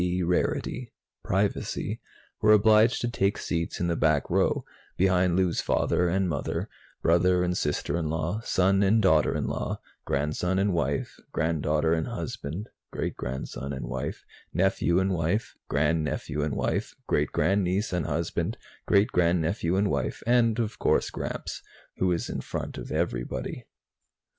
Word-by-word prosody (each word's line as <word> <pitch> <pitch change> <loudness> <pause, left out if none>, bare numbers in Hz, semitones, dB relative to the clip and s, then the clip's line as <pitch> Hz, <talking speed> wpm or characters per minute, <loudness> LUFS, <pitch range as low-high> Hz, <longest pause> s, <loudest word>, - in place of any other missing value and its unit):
D. 90 0 0
rarity 110 +7 -1 0.3
privacy - - -1 0.4
were 105 0 +6
obliged 110 +2 +5
to 120 - 0
take 100 -3 +1
seats 85 -1 -2
in 85 - 0
the 85 -1 +1
back 80 -3 +2
row, - - +2 0.3
behind 90 -1 +3
Lou's 90 -2 +2
father 90 0 +1
and 95 +2 +1
mother, 85 - -2 0.3
brother 90 +2 +4
and 90 0 0
sister 75 -1 -1
in 80 -2 -1
law, 80 +6 -1
son 95 -2 +2
and 100 +3 +4
daughter 85 -7 +4
in - - -1
law, - - -3 0.2
grandson 75 +6 0
and 100 0 +2
wife, 70 -4 -1
granddaughter 80 0 +1
and 80 -1 0
husband, 85 +9 -5 0.2
great - - -3
grandson 65 +2 -5
and 65 - -4
wife, 65 +2 -4 0.3
nephew 90 -1 +2
and 95 +1 +1
wife, 85 +6 -1 0.2
grandnephew 75 0 0
and 75 -1 -1
wife, - - -1
great - - +1
grandniece 95 +1 +1
and 90 -2 0
husband, 85 +5 -1 0.3
great 100 +3 +4
grandnephew 85 -1 +1
and 100 +1 +2
wife 70 -3 -2
and, 115 -2 +3
of 115 -2 -2
course, - - +2
Gramps, - - -5 0.4
who 95 - +1
was 90 -2 0
in - - -3
front - - -5
of - - -8
everybody. - - -3
90 Hz, 150 wpm, -27 LUFS, 80-100 Hz, 0.4 s, were